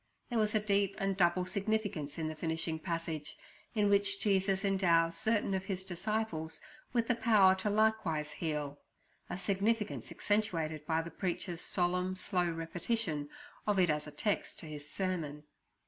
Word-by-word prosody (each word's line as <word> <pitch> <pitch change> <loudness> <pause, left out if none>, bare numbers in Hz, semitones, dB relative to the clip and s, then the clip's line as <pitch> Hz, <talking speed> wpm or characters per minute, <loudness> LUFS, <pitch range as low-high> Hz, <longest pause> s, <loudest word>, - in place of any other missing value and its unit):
There 235 - +2
was 215 0 +1
a - - +5
deep 200 -1 +1
and 195 0 0
double 180 0 +3
significance 200 -6 -1
in 160 -1 -1
the 155 - -3
finishing 160 0 -1
passage, 165 -3 -3 0.4
in 210 -1 +3
which 200 0 +4
Jesus 195 -1 +2
endows 170 -4 +3
certain 220 -3 +1
of 190 0 -1
His 190 -1 -3
disciples 180 -4 -2 0.3
with 235 -2 +1
the 245 - +4
power 220 -5 +5
to 190 +2 -1
likewise 205 -8 +1
heal—a 150 +1 -6
significance 205 +3 0
accentuated 165 -8 -1
by 165 0 +1
the 170 - -7
preacher's 175 0 -2
solemn, 180 +1 +1
slow 185 -2 0
repetition 165 -1 -1 0.4
of 205 -1 +3
it 180 -4 +4
as 150 0 -2
a - - -7
text 200 +8 -1
to - - -8
his 145 -1 -7
sermon. 165 -6 -2
185 Hz, 155 wpm, -33 LUFS, 160-205 Hz, 0.4 s, a